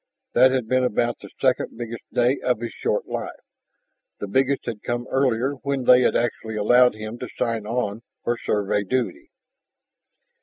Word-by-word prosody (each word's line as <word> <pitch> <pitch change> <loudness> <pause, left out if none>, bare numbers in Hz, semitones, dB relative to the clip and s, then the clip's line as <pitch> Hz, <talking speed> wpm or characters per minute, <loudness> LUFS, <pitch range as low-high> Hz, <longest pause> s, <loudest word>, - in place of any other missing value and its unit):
That 130 - +6
had 130 -3 -1
been 130 +2 +2
about 120 0 0
the - - -11
second 130 -3 +1
biggest 115 -1 -7
day 125 +3 +2
of 125 -3 +1
his 120 0 -4
short - - -1
life; - - -5 0.8
the - - -3
biggest 135 +6 +1
had 115 -3 -5
come 120 0 -3
earlier 130 0 +1
when 140 -2 -1
they 125 +1 +7
had - - +2
actually 110 -2 -1
allowed 120 +3 +5
him 110 +2 -7
to - - -6
sign 115 -2 -1
on 110 -2 -2 0.2
for 120 - 0
Survey 105 -2 0
duty. 115 -2 -2
120 Hz, 165 wpm, -23 LUFS, 110-130 Hz, 0.8 s, they